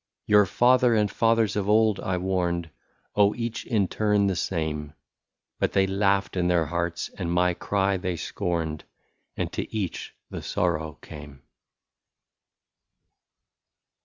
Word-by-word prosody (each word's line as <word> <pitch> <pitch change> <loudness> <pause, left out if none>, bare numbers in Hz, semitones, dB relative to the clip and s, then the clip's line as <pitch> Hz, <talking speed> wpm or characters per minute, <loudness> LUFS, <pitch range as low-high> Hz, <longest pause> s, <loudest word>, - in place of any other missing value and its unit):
" - - -62
Your 105 -2 +5
father 125 +2 +4
and 105 -1 +2
fathers 115 -3 +2
of 105 -1 -1
old 110 -1 +4
I 95 -1 -2
warned, 90 -3 -1 0.2
— - - -43
Oh! 105 0 +4
each 115 -1 -4
in 105 -6 +1
turn 105 0 +1
the 95 -1 +1
same; 80 -4 -3 0.7
But - - 0
they 95 - +4
laughed 95 0 +1
in 90 -1 +1
their 85 -2 +2
hearts 85 +2 -3
and 85 -2 -2
my 90 +1 +2
cry 95 +2 0
they 90 -1 -3
scorned. 80 -2 -3 0.5
And - - -2
to - - -4
each 100 -6 -4 0.2
the - - -5
sorrow 80 0 -1
came." 75 -3 -11
95 Hz, 140 wpm, -26 LUFS, 85-105 Hz, 0.7 s, Your